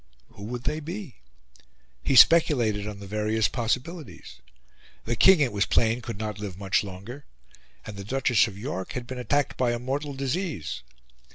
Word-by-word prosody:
Who 100 - -11
would 120 +2 -5
they 155 - -1
be? 170 - -7 0.8
He 135 - 0
speculated 120 -8 +5
on 105 -1 -6
the 100 - -9
various 105 +1 0
possibilities: 125 - -4 0.7
The 120 - -1
King, 190 - +7
it 130 -4 +2
was 100 0 +1
plain, 115 +1 +2
could 115 -3 -6
not 105 -1 -4
live 100 -4 -6
much 95 0 +1
longer; 100 +8 -9 0.6
and 105 -2 -8
the 100 - -6
Duchess 120 0 +2
of 100 -3 -9
York 100 -4 -5
had 125 -1 -4
been 125 +1 -6
attacked 145 +2 0
by 120 -2 +1
a - - -1
mortal 135 +4 -3
disease. 135 - -3
120 Hz, 170 wpm, -26 LUFS, 105-135 Hz, 0.8 s, King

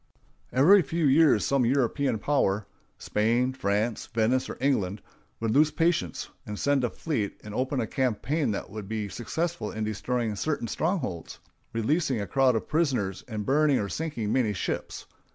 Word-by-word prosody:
Every 180 +10 +6
few 170 -2 -1
years 140 -5 +5
some 140 -2 +2
European 130 0 +1
power—Spain, 110 +1 0
France, 105 -1 -1
Venice, 115 +3 +1
or - - -6
England—would 110 -2 -2
lose 150 +6 +5
patience, 155 - 0 0.3
send 140 +4 +1
a 120 - +1
fleet, 115 -10 -3
and 105 - -8
open 130 +4 -1
a 115 - 0
campaign 130 +4 0
that 100 -2 -4
would 105 -2 -7
be 110 -2 -3
successful 165 - -3
in 110 - -4
destroying 110 +1 -2
certain 150 +1 -2
strongholds, 130 - -2 0.3
releasing 130 +3 0
a 100 - -2
crowd 130 +2 +3
of 110 - -2
prisoners, 130 - 0
and 105 -3 -4
burning 145 0 +3
or 100 - -2
sinking 120 -9 -2
many 115 -5 +2
ships. 90 - -4
125 Hz, 150 wpm, -27 LUFS, 105-145 Hz, 0.3 s, Every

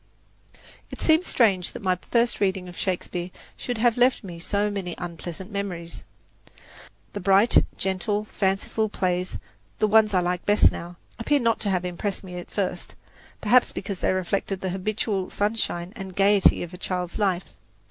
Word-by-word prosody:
It - - -9
seems 320 +2 +3
strange 195 -7 +2
that - - -8
my 185 -1 +2
first 235 0 +2
reading 190 -2 0
of 180 - -10
Shakespeare 180 -1 -3 0.3
should 245 -2 -4
have 235 +1 +2
left 250 0 +3
me 175 -3 -8
so 205 +4 0
many 190 -4 -4
unpleasant 175 +2 -7
memories. 180 -4 -4 1.1
The 205 - -4
bright, 195 +4 +5
gentle, 200 +3 -1
fanciful 205 +2 -1
plays 180 -2 -1 0.4
the 215 - +2
ones 215 -1 +4
I - - +5
like 180 0 -1
best 205 +1 +5
now 175 +1 -7 0.2
appear 290 +6 +2
not 230 -3 +1
to 205 - -2
have 180 -2 0
impressed 185 +3 -3
me 180 -2 -8
at 175 - -10
first, 185 -3 -3 0.5
perhaps 245 +4 +4
because 195 -1 -5
they - - +1
reflected 185 +1 -1
the 190 - -2
habitual 195 0 -2
sunshine 205 -4 -1
and 190 -3 -8
gaiety 200 -1 +4
of 175 +1 -8
a 180 - -9
child's 180 -1 -3
life. 190 -3 +1
195 Hz, 165 wpm, -25 LUFS, 180-210 Hz, 1.1 s, bright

